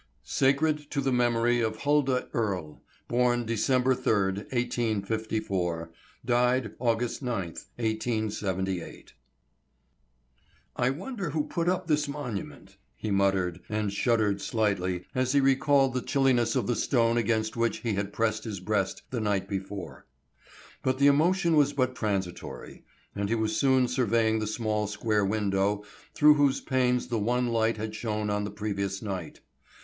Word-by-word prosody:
SACRED 150 +2 +1
TO 145 - -2
THE 135 -1 0
MEMORY 120 -1 +2
OF 110 -1 0
HULDAH 140 -3 +1
EARLE. 95 -9 -2 0.3
Born 120 0 +2
December 125 +3 +2
Third, 100 -6 +1
1854. 110 -7 -1 0.3
Died 125 -1 +2
August 120 0 0
Ninth, 95 -10 -4
1878. 105 -5 -2 1.6
"I 125 - +2
wonder 190 - -4
who 150 0 0
put 170 +3 -1
up 185 0 0
this 150 -2 +1
monument," 140 -9 -6 0.2
he 105 +11 -4
muttered, 95 -3 +1
and 105 -1 -1
shuddered 105 -2 +1
slightly 95 -5 -1
as 130 0 0
he 140 - +5
recalled 135 0 +3
the 125 - -1
chilliness 130 -3 +2
of 130 - +1
the 120 - 0
stone 115 -2 +2
against 110 -1 0
which 115 0 0
he 115 -3 -1
had 100 0 -2
pressed 110 0 0
his 105 -5 -5
breast 95 0 -1
the 120 -3 -2
night 100 -2 0
before. 95 -1 -6 0.7
But 130 0 0
the 140 - +3
emotion 170 +4 +4
was 145 -1 +4
but 130 -2 0
transitory, 100 -6 -4 0.3
and 100 0 -2
he 115 - +2
was 110 -1 -1
soon 130 -2 +3
surveying 115 -3 +1
the 110 - -2
small 105 -1 -1
square 105 0 0
window 100 0 0 0.3
through 150 0 +7
whose 145 -2 +2
panes 125 -2 +1
the 120 -3 -1
one 120 +3 +1
light 115 -1 +1
had 110 0 -4
shone 105 -2 -2
on 105 0 -1
the - - -4
previous 100 -1 -3
night. 95 -6 -5
115 Hz, 145 wpm, -28 LUFS, 105-130 Hz, 1.6 s, through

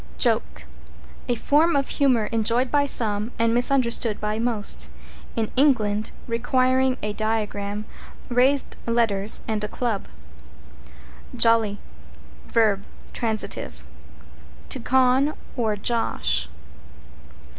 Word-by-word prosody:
=JOKE= - - 0 0.6
A 245 - +1
form 305 +7 +2
of 275 -1 +1
humor 255 -6 +2
enjoyed 230 +3 +1
by 285 -1 +2
some 215 -3 +1
and 230 0 +2
misunderstood 240 -3 +2
by 210 +1 -2
most; 230 -3 0 0.5
in 225 -2 -2
England, 220 -7 +2 0.2
requiring 255 +2 +1
a 210 0 -2
diagram, 210 -1 -2 0.4
raised 260 +3 +2
letters 220 -3 +1
and 215 -1 -2
a - - -1
club. 225 -2 -3 1.3
=JOLLY= 230 -3 +3 0.7
v. 220 -3 +3 0.4
t., 220 -3 -2 1.0
To - - -4
"con" 260 +3 +2 0.2
or 220 -4 0
"josh." 75 - 0
230 Hz, 100 wpm, -23 LUFS, 210-255 Hz, 1.3 s, =JOLLY=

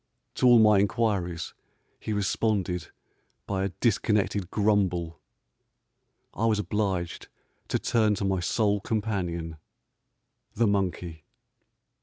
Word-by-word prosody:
To 125 - +2
all 120 -1 +8
my 105 -2 +6
inquiries 100 -5 -1 0.5
he - - -5
responded 100 -4 -1 0.6
by 95 -1 -2
a - - -1
dis 110 +3 +1
connected 100 -3 0
grumble. 95 -6 0 1.1
I 115 - 0
was 110 -2 +2
obliged 100 -5 -2 0.4
to - - 0
turn 110 -2 +2
to 100 - -3
my 95 -1 +1
sole 105 +3 +1
companion, 90 -7 -3 1.0
the 115 - +2
monkey. 90 -5 -1
100 Hz, 110 wpm, -27 LUFS, 90-110 Hz, 1.1 s, all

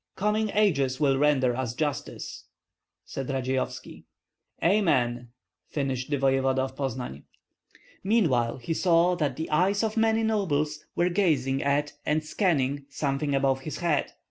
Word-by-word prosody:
"Coming 210 +2 0
ages 140 -11 +2
will 135 -3 +2
render 135 -4 +3
us 120 -2 -3
justice," 145 0 -4 0.6
said 135 -2 -5
Radzeyovski. 130 -1 -3 0.6
"Amen!" 125 - +2 0.4
finished 135 -3 -2
the 145 - +1
voevoda 135 -1 +2
of 130 0 -5
Poznan. 125 - -4 0.8
Meanwhile 155 - +2
he 130 +6 -3
saw 175 +1 +3
that 145 -6 -1
the 160 +3 -4
eyes 190 +7 +2
of 220 0 -1
many 225 0 +3
nobles 155 -9 0
were 175 +1 +2
gazing 145 -8 +1
at 145 +1 0
and 155 +1 0
scanning 145 -5 0
something 140 0 -1
above 135 -1 +2
his 155 - -5
head. 170 -4 0
145 Hz, 135 wpm, -27 LUFS, 130-175 Hz, 0.8 s, render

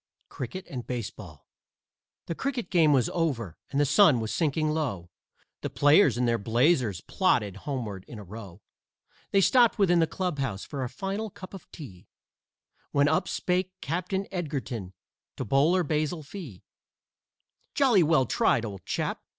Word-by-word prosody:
CRICKET 130 +10 -6
AND 125 -3 -7
BASEBALL 105 - -6 0.8
The - - -3
cricket 250 +4 -3
game 165 -4 +5
was 130 -5 +3
over 125 - -2
and 140 - -1
the 145 - +4
sun 150 - +5
was 110 -1 -3
sinking 155 -1 +1
low, 120 - -3 0.5
The - - -3
players 145 - +4
in 125 - +1
their 115 -1 +1
blazers 115 - +2
plodded 115 - +1
homeward 110 -9 -4
in 120 - -9
a 105 - -8
row. 100 -1 -10 0.7
They 195 - +3
stopped 240 +3 +4
within 175 -4 +4
the 165 - +3
clubhouse 145 - -3
for 140 -3 -5
a 125 - -3
final 195 - -4
cup 185 0 -12
of 195 - -11
tea, 105 - -11 0.8
When 145 0 +3
up 160 +5 +1
spake 185 +1 -1
Captain 185 +5 -2
Edgerton 130 - -4 0.4
to 130 - -3
Bowler 155 - +3
Basil 155 +1 -1
Fee: 145 - -9 1.1
"Jolly 255 -9 +5
well 155 -5 +3
tried, 115 0 +2
old 100 -4 -7
chap! - - -2
145 Hz, 150 wpm, -27 LUFS, 115-180 Hz, 1.1 s, game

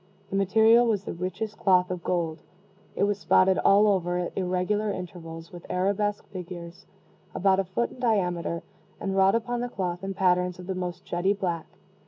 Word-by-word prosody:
The - - -2
material 220 +4 +5
was 205 -4 +1
the - - -5
richest 185 +5 -4
cloth 180 -2 +3
of 180 -2 -4
gold. 165 -3 -1 0.5
It - - +1
was 205 0 +1
spotted 190 -1 +4
all 200 +2 +5
over, 180 -3 +1
at 180 -1 -3
irregular 185 +3 0
intervals, 170 -3 -7
with 175 -1 -10
arabesque 200 +3 0
figures, 175 -2 -8 0.5
about 190 0 +3
a - - +2
foot 195 +6 -1
in - - -13
diameter, 180 -8 0 0.4
and 195 -1 -2
wrought 195 +1 +4
upon 240 +1 -1
the 245 - -2
cloth 180 -4 -3
in 195 0 -4
patterns 180 -1 +2
of 180 - -9
the 190 - -2
most 180 -1 -5
jetty 175 +3 +1
black. 175 -5 -3
185 Hz, 180 wpm, -27 LUFS, 180-205 Hz, 0.5 s, material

